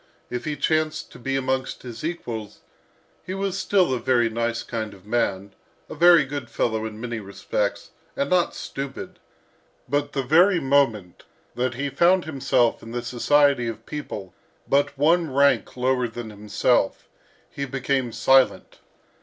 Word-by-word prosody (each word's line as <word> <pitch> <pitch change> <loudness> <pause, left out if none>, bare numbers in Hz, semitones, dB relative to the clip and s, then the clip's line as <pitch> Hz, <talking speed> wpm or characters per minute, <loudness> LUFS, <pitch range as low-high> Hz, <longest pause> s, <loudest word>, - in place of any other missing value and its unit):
If 125 -1 -4
he 150 -1 -2
chanced 155 +2 -1
to - - -13
be 135 +3 -2
amongst 130 0 -2
his 120 -1 -8
equals, 115 -11 -5 0.6
he 185 +2 -5
was 195 -1 -2
still 185 -6 +2
a 125 - -1
very 120 -2 +2
nice 115 +1 -1
kind 110 -3 -5
of 95 0 -19
man, 100 -3 -1 0.4
a - - -6
very 170 -1 +6
good 140 -3 -6
fellow 110 -1 -1
in 110 -1 -9
many 120 -1 -4
respects, 100 0 -3 0.2
and 140 - 0
not 180 +2 +1
stupid, 135 0 -6 0.7
but 145 +2 -1
the 135 - -1
very 175 +7 +5
moment 130 -10 +1 0.3
that 125 0 -1
he 140 +2 -3
found 175 +6 +3
himself 135 -5 +1
in 115 - -10
the 120 0 -3
society 140 +1 +2
of 115 - -6
people 105 - -7 0.3
but 140 0 +1
one 160 +2 +3
rank 140 -1 +2
lower 125 0 +1
than 115 -1 -7
himself, 105 +1 0 0.4
he 140 - -4
became 135 -1 -1
silent. 130 +3 +2
130 Hz, 155 wpm, -24 LUFS, 115-145 Hz, 0.7 s, very